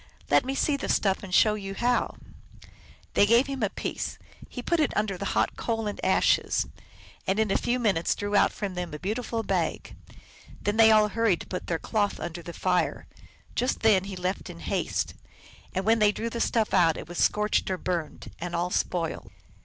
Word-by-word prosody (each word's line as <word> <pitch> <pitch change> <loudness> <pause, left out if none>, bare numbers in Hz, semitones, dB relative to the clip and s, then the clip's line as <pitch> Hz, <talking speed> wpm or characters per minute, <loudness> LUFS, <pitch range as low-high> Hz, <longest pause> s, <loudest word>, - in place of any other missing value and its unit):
Let - - +5
me 270 +1 -2
see 285 +1 +1
the 280 - -5
stuff 195 -2 +2
and 195 - -9
show 215 +4 +5
you 195 -2 -5
how! 245 +4 +1 0.5
" - - -23
They 205 - +5
gave 235 +4 +5
him 275 -2 -5
a 210 - +2
piece: - - -4 0.3
he 245 - -7
put 340 +5 +1
it 300 - +1
under 210 -2 0
the 200 +2 -3
hot - - +1
coals 225 -2 -2
and 205 - -7
ashes, - - +2 0.6
and 190 - +1
in 220 -2 +2
a - - +2
few 245 +1 +1
minutes 200 -9 +1
drew 205 0 -3
out - - +5
from 200 -3 -4
them 180 -4 -4
a - - -4
beautiful 225 +5 -3
bag. - - -2 0.6
Then 205 +1 -1
they 225 -1 +8
all 215 -1 +5
hurried 225 -4 +1
to - - -9
put 180 - -5
their 165 - 0
cloth 205 +3 -1
under 175 0 -5
the 170 - -8
fire. 180 +1 0 0.5
Just 250 - 0
then 205 -4 +4
he 195 -1 -6
left 180 +1 -3
in - - -9
haste. - - -1 0.6
And 190 0 -2
when 225 +1 +4
they 210 -1 +5
drew 230 +2 -4
the 235 - -3
stuff 225 -3 +1
out 165 -3 +4
it - - -7
was 175 +1 -6
scorched 210 -1 +2
or 185 - -1
burned, 175 -3 -4
and 175 0 -4
all 175 +1 -1
spoiled. 170 -3 -2
205 Hz, 210 wpm, -27 LUFS, 180-225 Hz, 0.6 s, they